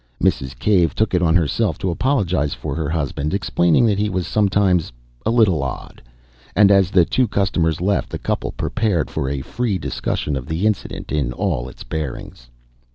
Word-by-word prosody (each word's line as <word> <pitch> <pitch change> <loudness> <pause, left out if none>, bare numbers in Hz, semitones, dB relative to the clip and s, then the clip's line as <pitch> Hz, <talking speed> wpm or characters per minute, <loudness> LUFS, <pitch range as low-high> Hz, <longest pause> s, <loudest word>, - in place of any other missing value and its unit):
Mrs. 65 -2 0
Cave 90 - +2
took 110 -2 0
it 90 - +2
on 85 -1 +3
herself 85 +2 +1
to 95 - -2
apologise 90 - 0
for - - -5
her 80 -3 -2
husband, 75 0 -2
explaining 85 +1 +2
that 105 -3 +2
he 105 0 +1
was 90 -3 -2
sometimes 100 -6 +2 0.4
"a - - +3
little 110 - +3
odd," 65 -2 -6 0.5
and 100 -1 +6
as 95 -2 +4
the 90 -3 +4
two 130 +6 +1
customers 85 -6 0
left, 100 +2 0
the - - -4
couple - - -2
prepared 105 -9 -1
for 65 - -2
a 70 -1 -3
free 115 - -2
discussion 75 -1 -3
of 65 -1 -5
the 80 +6 -1
incident 105 -2 -2
in 70 -5 0
all 70 -6 -2
its - - -12
bearings. 65 -5 -6
90 Hz, 180 wpm, -20 LUFS, 75-100 Hz, 0.5 s, and